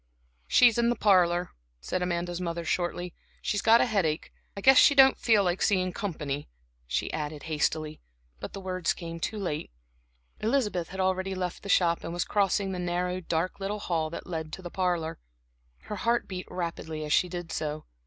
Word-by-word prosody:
"She's 240 -2 +5
in 235 0 +3
the 240 - +1
parlor," 180 -4 +3 0.3
said 180 - -3
Amanda's 175 0 -2
mother, 170 -1 -3
shortly. 175 +1 -2 0.3
"She's 205 - -1
got 230 +1 +6
a - - +4
headache. 185 -9 -1 0.2
I - - -4
guess 265 +4 +7
she 285 - +6
don't 270 -1 +7
feel 220 -4 +3
like 180 0 0
seeing 185 -3 +2
company," 150 -7 -4 0.4
she - - -2
added 150 -1 -4
hastily, 155 0 -1 0.4
but - - -7
the 195 - -6
words 185 -2 -1
came 165 -1 -7
too 215 +6 -3
late. 175 -7 -3 0.7
Elizabeth 215 -7 0
had 190 - -8
already 190 0 0
left 180 -1 -3
the 200 - -8
shop, 170 -3 +3
and 170 - -5
was 175 - -1
crossing 200 -1 +1
the 185 - -4
narrow, 180 +1 -1
dark 170 +1 -2
little 200 +2 -2
hall 165 -6 -1
that 170 - -7
led 160 -3 -5
to 190 - -7
the 175 - -7
parlor. 175 -3 -1 0.6
Her 210 - -6
heart 235 +4 +1
beat 185 -1 -6
rapidly 160 -3 -4
as 150 - 0
she 180 - +3
did 175 -1 -6
so. 155 0 -3
180 Hz, 185 wpm, -28 LUFS, 165-195 Hz, 0.7 s, guess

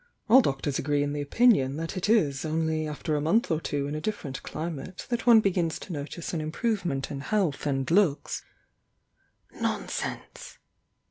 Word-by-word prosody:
All 250 +4 +8
doctors 135 - -1
agree 145 0 +1
in 145 0 -2
the 145 - -2
opinion 145 - +3
that 165 +3 -4
it 185 +2 -2
is 150 - +3
only 160 0 -1
after 150 +1 -2
a 145 - 0
month 185 +10 +2
or 160 0 +1
two 145 -3 -2
in 145 - -4
a 155 - -3
different 155 -9 -4
climate 165 +3 -6
that 240 0 -2
one 230 -2 +8
begins 175 -5 0
to 185 - -8
notice 150 +4 -5
an 165 - -1
im 155 0 -4
provement 175 - -1
in 140 - -4
health 160 -3 0
and 135 +1 -1
looks 175 -6 +2 0.6
" - - -42
"Nonsense!" - - -4
155 Hz, 180 wpm, -27 LUFS, 145-195 Hz, 0.6 s, All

